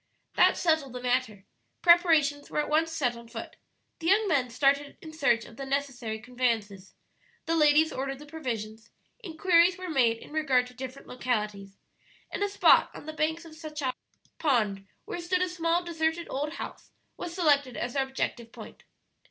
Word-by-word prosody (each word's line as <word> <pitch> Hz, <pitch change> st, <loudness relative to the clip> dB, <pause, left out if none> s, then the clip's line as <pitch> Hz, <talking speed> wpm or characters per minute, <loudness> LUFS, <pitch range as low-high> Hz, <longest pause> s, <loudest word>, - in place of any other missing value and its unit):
That -, -, +4 dB
settled 315 Hz, -6 st, +1 dB
the 250 Hz, -, -5 dB
matter. 245 Hz, -5 st, -1 dB, 0.4 s
Preparations 320 Hz, -5 st, +4 dB
were -, -, -5 dB
at 300 Hz, -, -1 dB
once 325 Hz, +2 st, +2 dB
set 270 Hz, -7 st, 0 dB
on 235 Hz, 0 st, -12 dB
foot: 230 Hz, -, -8 dB, 0.4 s
the 330 Hz, -, -4 dB
young 410 Hz, +3 st, +4 dB
men 275 Hz, -8 st, +1 dB
started 280 Hz, +3 st, +1 dB
in 315 Hz, -1 st, -11 dB
search 270 Hz, -7 st, +2 dB
of 230 Hz, -, -14 dB
the 275 Hz, -, -5 dB
necessary 265 Hz, -5 st, -2 dB
conveyances, 225 Hz, -5 st, -2 dB, 0.5 s
the 330 Hz, -, 0 dB
ladies 305 Hz, 0 st, +4 dB
ordered 270 Hz, +1 st, -3 dB
the 295 Hz, -, -12 dB
provisions, 225 Hz, -8 st, -6 dB, 0.3 s
inquiries 345 Hz, 0 st, +3 dB
were 370 Hz, -2 st, -5 dB
made 240 Hz, -6 st, +3 dB
in -, -, -14 dB
regard 275 Hz, -5 st, +2 dB
to 250 Hz, -, -13 dB
different 260 Hz, +1 st, -8 dB
localities, 210 Hz, -6 st, -3 dB, 0.5 s
and -, -, -4 dB
a 405 Hz, -, +1 dB
spot 395 Hz, -, +5 dB
on -, -, -10 dB
the 310 Hz, -, -6 dB
banks 320 Hz, +2 st, -1 dB
of 325 Hz, -, -12 dB
Sachacha 300 Hz, -4 st, -4 dB, 0.5 s
Pond, 215 Hz, -10 st, +1 dB, 0.2 s
where -, -, -5 dB
stood 365 Hz, +1 st, +1 dB
a -, -, 0 dB
small 340 Hz, 0 st, 0 dB
deserted 330 Hz, 0 st, -1 dB
old 295 Hz, +3 st, -2 dB
house, -, -, -8 dB, 0.3 s
was 340 Hz, -1 st, -6 dB
selected 285 Hz, -7 st, +2 dB
as 240 Hz, 0 st, -3 dB
their 275 Hz, -, +1 dB
objective 240 Hz, -3 st, -4 dB
point. -, -, -12 dB
285 Hz, 175 wpm, -28 LUFS, 245-325 Hz, 0.5 s, spot